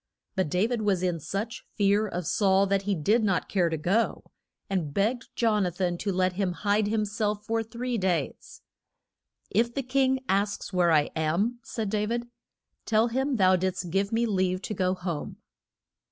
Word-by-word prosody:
But 190 -5 0
Da 180 +6 +2
vid 235 -1 -1
was 195 -4 +1
in 175 -2 0
such 200 +9 -4
fear 205 +1 +3
of 180 -3 -4
Saul 195 +2 +3
that 195 0 +1
he 200 0 -1
did 210 +9 +2
not 195 -4 +1
care 180 -4 +1
to 160 - -2
go, 195 +9 0 0.4
and 170 -7 -2
begged 230 +6 0
Jon 215 -3 +2
a 180 - +1
than 175 0 -1
to 200 - -1
let 185 0 +1
him 185 -1 -1
hide 205 +2 +1
him 215 0 +1
self 210 0 -2
for 225 +1 0
three 235 +2 -3
days. 175 -7 -2 0.9
If 235 +3 +1
the 275 - -1
king 260 +1 +1
asks 200 +1 -1
where 175 -2 +3
I 150 -2 +3
am, 175 +10 0
said 220 -7 -4
Da 210 -1 0
vid, 235 +1 -2 0.6
tell 225 +1 +3
him 265 +3 0
that - - -1
thou 185 -2 +5
did'st 180 -1 -2
give 195 +2 0
me 230 +1 +2
leave 185 -3 0
to 215 - -3
go 185 -2 0
home. 175 -4 -5
200 Hz, 190 wpm, -27 LUFS, 185-225 Hz, 0.9 s, thou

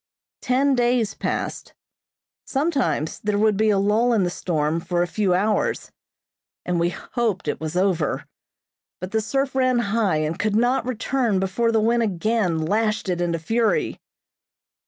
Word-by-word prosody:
Ten 270 +2 +2
days 240 -3 +1
passed. - - -4 0.7
Sometimes 275 - -1
there 210 -1 -1
would 215 0 +3
be 215 +2 +2
a 205 - +3
lull 215 +5 +2
in 210 -4 +2
the 175 - -1
storm 160 -3 -1
for 175 +1 0
a - - -2
few 190 0 +1
hours 210 +4 0 0.7
and 180 -1 0
we 170 +1 +2
hoped 220 +1 -3
it - - -2
was 160 +2 -3
over, 180 -6 0 0.7
but 185 +1 -6
the 220 0 +1
surf 270 +5 -1
ran 255 -1 +2 0.2
high 210 -8 +2
and 155 +3 -2
could 210 0 0
not 245 +2 +2
return 240 -3 0
before 195 +5 0
the 225 - +2
wind 235 +2 +2
again 205 -3 0
lashed 215 +2 0
it 175 -1 -1
into 170 -1 0
fury. 225 +8 0
215 Hz, 155 wpm, -23 LUFS, 180-235 Hz, 0.7 s, would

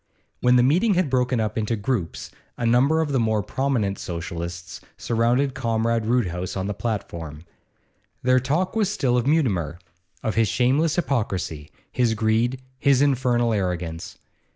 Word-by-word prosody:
When 125 0 +4
the 125 - +5
meeting 185 - +3
had 175 -6 +1
broken 125 -1 +1
up 110 +1 -1
into 110 +2 -1
groups, 105 -4 -3 0.3
a 120 - -2
number 135 +7 +3
of 155 -3 -2
the 135 - +2
more 110 -2 +1
prominent 115 -6 -1
Socialists 85 0 -6 0.2
surrounded 120 +4 +1
Comrade 115 -2 0
Roodhouse 95 -7 -1
on 95 - -2
the 105 - -2
platform. 85 -9 -5 0.8
Their 130 0 +4
talk 155 - -1
was 215 -4 +2
still 130 -11 +1
of 125 +1 +1
Mutimer, 100 - +1 0.5
of 110 - -1
his 115 -1 +2
shameless 140 - +2
hypocrisy, 95 - -2 0.2
his 120 -3 +1
greed, 115 +4 0 0.2
his 140 -1 +4
infernal 125 -4 +2
arrogance. 90 -4 -3
115 Hz, 150 wpm, -23 LUFS, 100-130 Hz, 0.8 s, the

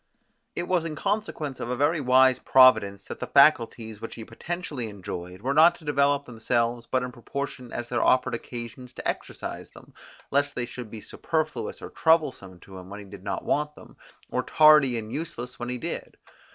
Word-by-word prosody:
It 175 - -2
was 180 -3 +1
in 160 -2 -4
consequence 195 - -2
of 120 - -4
a 125 - -1
very 145 +5 +1
wise 130 0 +5
Providence, 110 -7 +5
that - - -8
the - - -4
faculties, 115 -6 +3
which 115 - -7
he 110 - -8
potentially 145 -1 -5
enjoyed, 90 -1 -7
were 135 +2 0
not 165 +4 +6
to 160 - -16
develop 140 -1 +2
themselves 115 0 -1
but 130 -1 0
in 125 - -4
proportion 125 +1 -6
as 120 - -4
there 120 -1 0
offered 130 0 +3
occasions 120 +1 -7
to - - -5
exercise - - -5
them, - - -16 0.4
lest 140 +1 +1
they 120 - -1
should 120 -2 -8
be 110 0 -8
superfluous 155 +6 -3
or - - -7
troublesome 140 - +1
to 95 -1 -11
him 90 0 -12
when 100 +1 -8
he - - -11
did 100 -1 -12
not 100 -1 -4
want 150 0 0
them, - - -15 0.4
or - - 0
tardy 150 -5 +5
and 110 0 -6
useless 135 -6 -6
when 120 0 -4
he 125 - -2
did. - - -6
125 Hz, 190 wpm, -26 LUFS, 115-150 Hz, 0.4 s, not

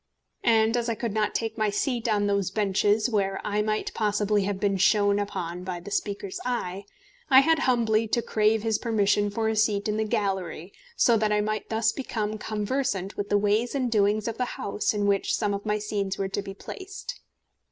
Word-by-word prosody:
And 225 0 +3
as 240 -1 0
I 230 - 0
could 230 -2 -3
not 215 -1 0
take 225 0 -2
my 215 -1 +2
seat 235 +3 -1
on 205 -1 +2
those 200 -2 +1
benches 210 +1 +2
where 195 -4 0
I 210 0 0
might 215 0 -2
possibly 210 -1 +1
have 200 -1 -2
been 200 0 +1
shone 205 +1 +3
upon 180 -3 -4
by 180 -1 -4
the 205 +4 -10
Speaker's 200 -2 -3
eye, 200 -6 -3 0.4
I 265 -1 +8
had 320 +2 +3
humbly 230 -5 +2
to 235 +2 0
crave 215 -1 +2
his 220 -2 +1
permission 205 -3 +2
for 220 +2 -1
a 220 - 0
seat 210 -1 +1
in 210 0 -1
the 220 - +1
gallery, 195 -5 -2 0.2
so 235 -3 +4
that 215 -1 +1
I 210 - +3
might 215 0 -3
thus 220 0 +2
become 215 -5 -3
conversant 210 -2 -2
with 205 0 -4
the 205 - +3
ways 210 +5 +1
and 255 -3 0
doings 210 0 +2
of 230 +1 -4
the 250 - +1
House 205 - -1
in 205 -1 0
which 200 -1 +1
some 210 -2 0
of 200 +2 -5
my 210 0 +1
scenes 205 -2 -2
were 195 -1 -2
to 200 - -2
be 195 -1 -8
placed. 390 - -8
210 Hz, 205 wpm, -26 LUFS, 200-225 Hz, 0.4 s, I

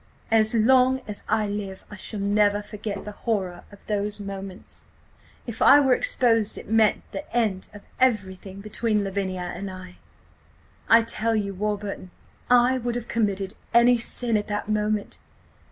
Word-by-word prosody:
"As 220 +1 +4
long 255 +3 +4
as 210 -1 -3
I 220 0 +2
live 200 -2 -5
I - - -7
shall 210 +1 -6
never 205 0 +2
forget 205 -1 -6
the 210 - -6
horror 195 -5 -3
of 205 - -16
those 210 0 -2
moments. 195 -2 -7 0.6
If 235 -3 -7
I 285 - +8
were 265 -3 +4
exposed 235 - +2
it - - -9
meant 220 -1 +3
the 195 - -7
end 215 -6 0
of 205 -1 -12 0.2
everything 200 -5 0
between 215 0 0
Lavinia 185 -2 -3
and 195 +3 -5
me. 185 -1 -10 0.9
I 230 0 +7
tell 230 0 +1
you, 200 -2 -1
Warburton, 205 -1 -4 0.4
I 250 +1 +4
would 240 0 -2
have 240 -1 -4
committed 200 -3 -1 0.2
any 240 +1 +6
sin 235 -1 +1
at 205 - -3
that 205 0 -3
moment! 210 -1 -1
210 Hz, 155 wpm, -25 LUFS, 200-230 Hz, 0.9 s, I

